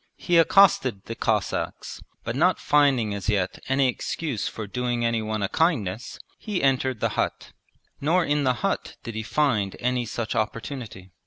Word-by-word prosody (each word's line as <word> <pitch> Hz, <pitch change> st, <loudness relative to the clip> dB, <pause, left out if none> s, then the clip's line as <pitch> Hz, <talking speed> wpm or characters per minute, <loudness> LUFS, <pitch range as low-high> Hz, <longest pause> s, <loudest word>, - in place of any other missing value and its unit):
He 175 Hz, -2 st, +3 dB
accosted 160 Hz, -, +4 dB
the 115 Hz, -, -5 dB
Cossacks, 110 Hz, -3 st, -2 dB, 0.2 s
but 115 Hz, -, -3 dB
not 175 Hz, +6 st, +3 dB
finding 135 Hz, -8 st, +3 dB
as 100 Hz, +1 st, -3 dB
yet 95 Hz, -3 st, 0 dB
any 135 Hz, 0 st, +3 dB
excuse 130 Hz, 0 st, -3 dB
for 110 Hz, -, -5 dB
doing 120 Hz, +2 st, -1 dB
anyone 110 Hz, -2 st, -1 dB
a -, -, +1 dB
kindness, 120 Hz, -, 0 dB, 0.2 s
he 205 Hz, -7 st, -3 dB
entered 130 Hz, -3 st, +1 dB
the -, -, +2 dB
hut; -, -, -2 dB, 0.5 s
nor 165 Hz, +4 st, +2 dB
in 145 Hz, 0 st, +1 dB
the 130 Hz, -1 st, +3 dB
hut -, -, -2 dB
did 115 Hz, -, -6 dB
he 110 Hz, -, -3 dB
find 110 Hz, -5 st, 0 dB
any 125 Hz, -1 st, 0 dB
such 110 Hz, +1 st, -3 dB
opportunity. 110 Hz, -3 st, -4 dB
120 Hz, 160 wpm, -25 LUFS, 110-145 Hz, 0.5 s, accosted